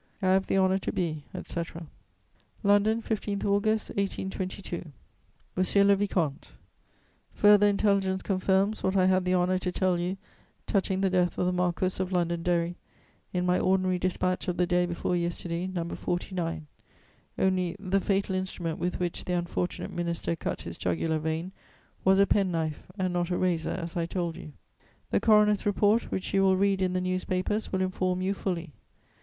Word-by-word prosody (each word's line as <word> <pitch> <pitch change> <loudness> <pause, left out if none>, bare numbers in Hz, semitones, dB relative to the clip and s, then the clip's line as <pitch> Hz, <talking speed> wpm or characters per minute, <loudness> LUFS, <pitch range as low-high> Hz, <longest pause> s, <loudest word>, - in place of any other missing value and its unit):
"I 190 -2 +1
have 190 +1 +3
the - - +1
honour 190 0 +3
to - - -3
be, 155 -5 -2
etc." 170 0 -5 0.8
"LONDON, 210 +3 +3
15 205 -2 -2
August 210 +2 +1
1822. 190 -3 -4 0.6
"MONSIEUR 185 +2 +3
LE 200 0 +5
VICOMTE, 175 -7 -1 0.8
"Further 205 0 +6
intelligence 200 -2 +1
confirms 195 +2 +1
what 190 +1 0
I 185 -1 +4
had 185 0 +3
the 180 0 +2
honour 180 +1 +2
to 180 0 -2
tell 180 -1 +1
you 180 +2 -2 0.5
touching 190 -1 0
the 195 -1 +2
death 180 -1 +1
of - - +1
the 180 - +2
Marquess 180 +1 0
of 185 0 -2
Londonderry, 170 0 0 0.5
in 180 0 -1
my 180 0 +2
ordinary 185 -1 +2
dispatch 185 +1 -1
of 180 - -1
the 180 - +3
day 175 0 +2
before 175 +1 -1
yesterday, 170 0 -2
No. 175 -3 -3
49. 170 -2 -3 0.7
Only, 185 -2 +1
the 195 0 +1
fatal 195 0 0
instrument 185 -3 -3
with 180 +1 -2
which 175 -1 -3
the 180 - -2
unfortunate 175 0 -2
minister 170 -1 -2
cut - - -4
his 85 - -8
jugular 155 - 0
vein 160 +3 -3 0.5
was 190 0 +5
a 200 - +6
pen 200 -1 +2
knife, 160 -3 -3
and 185 -2 -1
not 175 0 0
a 180 - 0
razor 175 -3 0
as 170 -2 -4
I 170 -1 -1
told 170 -2 -2
you. 160 -4 -10 0.6
The - - +3
coroner's 210 -2 +4
report, 205 +3 +2
which 190 - -3
you 195 - +4
will 190 -1 +4
read 195 0 +2
in 185 -1 +1
the 185 - 0
newspapers, 185 +3 -1
will 190 0 +1
inform 185 0 -1
you 195 +1 +1
fully. 175 -6 -4
185 Hz, 170 wpm, -28 LUFS, 175-195 Hz, 0.8 s, Further